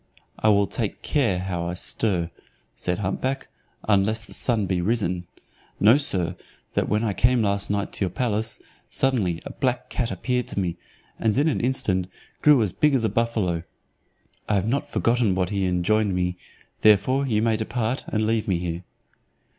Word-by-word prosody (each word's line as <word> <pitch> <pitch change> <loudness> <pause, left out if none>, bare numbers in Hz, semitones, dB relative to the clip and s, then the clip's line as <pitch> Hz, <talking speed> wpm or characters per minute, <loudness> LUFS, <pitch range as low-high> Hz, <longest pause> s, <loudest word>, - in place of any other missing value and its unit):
"I 110 - +3
will 100 -1 +4
take 110 0 -4
care 120 -11 +1
how 90 -2 -3
I 90 - -3
stir," 90 -3 -1 0.4
said 90 0 -2
hump 100 -2 -2
back, 135 +1 -2 0.4
"unless 110 +2 +2
the - - -12
sun 115 -5 +2
be 90 -1 0
risen. 90 -4 0 0.5
Know, 110 +7 +7
sir, 90 - 0 0.4
that - - 0
when 105 +1 +1
I 105 -3 0
came 125 +2 +3
last 100 -1 0
night 100 -2 -1
to 100 - -1
your - - -2
palace, 110 +1 -1 0.3
suddenly 105 -11 0
a - - -5
black 125 -2 -2
cat 120 -2 -1
appeared 125 0 -1
to - - -3
me, 90 -3 -1 0.4
and 110 0 +1
in 145 +3 +3
an 155 - +1
instant 100 -8 0 0.3
grew 145 -6 +6
as 100 - -2
big 150 -2 +3
as 125 - +1
a 110 - +2
buffalo. 110 -8 0 0.9
I 105 - +3
have 100 +1 +1
not 135 +5 -1
forgotten 115 -5 +2
what 90 0 0
he 100 -2 0
enjoined 95 +3 +1
me, 90 0 0 0.5
therefore 120 +7 +4
you 110 -3 +1
may 115 -1 +2
depart, 115 +3 -2
and 110 -1 0
leave 110 0 0
me 95 -4 +2
here." 85 0 -4
105 Hz, 180 wpm, -24 LUFS, 95-120 Hz, 0.9 s, Know